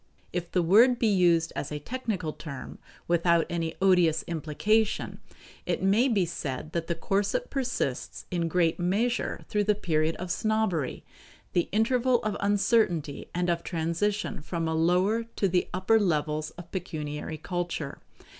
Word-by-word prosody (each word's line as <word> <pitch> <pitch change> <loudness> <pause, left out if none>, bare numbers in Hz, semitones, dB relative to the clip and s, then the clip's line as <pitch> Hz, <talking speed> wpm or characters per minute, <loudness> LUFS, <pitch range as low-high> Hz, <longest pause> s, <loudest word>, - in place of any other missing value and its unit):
If 175 -1 -3
the 180 - +2
word 230 +9 +6
be 235 - 0
used 175 -5 +3
as 145 - -4
a 150 - -2
technical 190 - -3
term, 140 -5 -8 0.3
without 170 -1 +3
any 165 -1 -2
odious 175 -4 +4
implication, 185 +7 0 0.5
it - - -1
may 210 +7 +4
be 205 -8 +2
said 155 -2 -5
that 165 -1 -2
the 170 - -1
corset 200 - -1
persists 245 - -2
in 170 -2 0
great 165 0 +1
measure 210 +8 0
through 210 -1 0
the 210 0 +3
period 160 -5 0
of 180 0 -5
snobbery 215 -10 0 0.5
the 175 - +1
interval 245 +3 +2
of 215 -1 -1
uncertainty 200 -7 +1
and 180 0 0
of 170 -1 +1
transition 170 +4 -1
from 165 +2 -3
a 160 - 0
lower 180 +8 +2
to 200 - +2
the 180 -1 +1
upper 185 +5 +3
levels 155 -4 0
of 175 -1 -10
pecuniary 155 -4 -4
culture. 175 -3 -4
175 Hz, 150 wpm, -28 LUFS, 160-210 Hz, 0.5 s, word